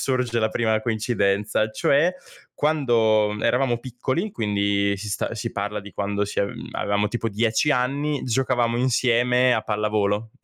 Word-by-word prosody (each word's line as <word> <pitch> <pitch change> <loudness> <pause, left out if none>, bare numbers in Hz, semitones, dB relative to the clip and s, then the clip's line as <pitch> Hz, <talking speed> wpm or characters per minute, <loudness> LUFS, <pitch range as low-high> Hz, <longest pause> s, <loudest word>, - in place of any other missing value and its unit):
sorge 125 -3 0
la 110 - +2
prima 110 -1 0
coincidenza, 110 -2 0
cioè 150 +10 +2 0.4
quando 115 -8 +2
eravamo 125 -1 +2
piccoli, 130 - -3
quindi 100 -2 0
si 105 +1 -6
sta 115 - -2
si 105 - -4
parla 105 +1 -3
di 100 0 -12
quando 100 0 -1
si 100 - -2
a 100 - +1 0.3
avevamo 100 +1 0
tipo 115 0 -2
10 110 +7 +1
anni, 140 +3 0
giocavamo 120 -1 0
insieme 125 0 +3
a 110 - +1
pallavolo, 105 0 -1
115 Hz, 145 wpm, -23 LUFS, 105-125 Hz, 0.4 s, insieme